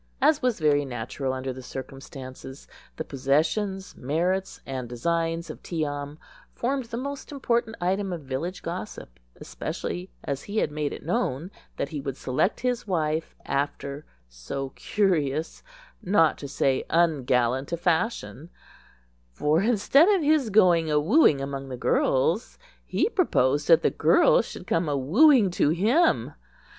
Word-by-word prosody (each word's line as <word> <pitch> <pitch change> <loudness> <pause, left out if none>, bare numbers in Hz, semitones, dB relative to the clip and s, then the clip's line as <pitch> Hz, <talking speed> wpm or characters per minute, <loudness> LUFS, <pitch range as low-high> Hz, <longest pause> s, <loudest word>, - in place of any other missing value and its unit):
As 295 +2 +3
was 250 -5 0
very 145 -2 +3
natural 130 +1 -4
under 130 0 -4
the 130 - -9
circumstances, 130 0 -9 0.3
the - - -4
possessions, 160 +9 -1
merits, 175 +8 -1
and 130 -3 -5
designs 165 +6 -1
of - - -12
Tee 160 -3 -2
am 145 0 -5 0.4
formed 265 +1 -1
the 230 0 -6
most 280 +3 -6
important 235 -5 -1
item 190 +2 -1
of 170 -3 -4
village 145 +8 -4
gossip, - - -7 0.2
especially 175 - -5
as 140 -1 -3
he 205 +2 -5
had 215 - +1
made 150 -1 -2
it - - -8
known 175 - -1 0.3
that 140 - -2
he 150 -2 -5
would 135 -2 -5
select 130 - 0
his 250 -3 -1
wife 160 -3 -1
after 140 +1 -3 0.2
so - - -6
curious, 155 -4 -1 0.4
not 175 -4 +3
to 140 - -6
say 135 -1 0
ungallant, 130 -5 +1
a 170 - -1
fashion; 165 - -1 0.8
for 150 - +1
instead 245 - +4
of 390 -6 +3
his 295 -5 +3
going 180 -6 +4
awooing 150 - +4
among 135 -1 -5
the 130 - -5
girls, 150 - +1 0.3
he - - +1
proposed 145 - +1
that 165 -2 +6
the - - +3
girls - - +4
should - - -9
come 165 +1 0
awooing 190 - +4
to 160 - +2
him. 225 - +2
160 Hz, 145 wpm, -26 LUFS, 135-205 Hz, 0.8 s, that